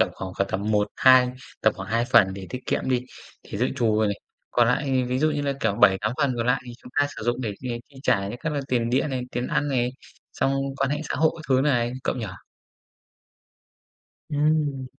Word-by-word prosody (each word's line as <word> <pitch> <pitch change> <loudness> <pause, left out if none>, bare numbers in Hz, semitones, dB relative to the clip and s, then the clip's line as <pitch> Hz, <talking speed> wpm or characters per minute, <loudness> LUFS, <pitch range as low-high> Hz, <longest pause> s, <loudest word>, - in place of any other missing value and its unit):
tầm - - +4
khoảng 95 -1 -6
cỡ 100 - +3
tầm 100 +2 -3
một, 105 -1 +2
hai 130 -1 +6 0.3
tầm 110 - +5
khoảng 95 - -7
2 115 +2 +1
phần 95 -6 +5
để 95 -1 -7
tiết 125 - -4
kiệm - - -1
đi, 125 -2 +2 0.4
thì 100 - -7
dự 125 - +2
trù 115 -5 +2
rồi 110 - +3
này. 100 -1 -2 0.3
Còn 120 -1 +4
lại 130 0 +1
ví 125 +1 0
dụ 155 +2 +3
như 145 -1 -1
là, 140 -1 0
kiểu, 110 -3 +1
7-8 105 -1 +4
phần 140 -3 +2
còn 115 0 -1
lại 125 +2 +2
thì 120 - -7
chúng 125 - -12
ta 145 - +4
sử - - -6
dụng 120 +2 0
để, 115 - -2 0.2
ờ, 120 - -2
chi 140 - -19
trả 105 -8 +2
những 120 - -6
các 160 - -1
là 145 - -1
tiền 120 -2 0
điện 135 +4 +1
này, 130 -1 -2
tiền 125 +1 -2
ăn 145 - 0
này, 125 -3 +1 0.4
xong 135 - +1 0.2
quan 135 - 0
hệ 150 - -1
xã - - -1
hội 160 +1 +4
các 160 - -9
thứ 130 -1 +4
này, 120 -4 +1
cậu - - 0
nhỉ? 115 -4 -3 2.0
Ừm. 145 -2 +1
125 Hz, 235 wpm, -25 LUFS, 110-140 Hz, 2.0 s, hai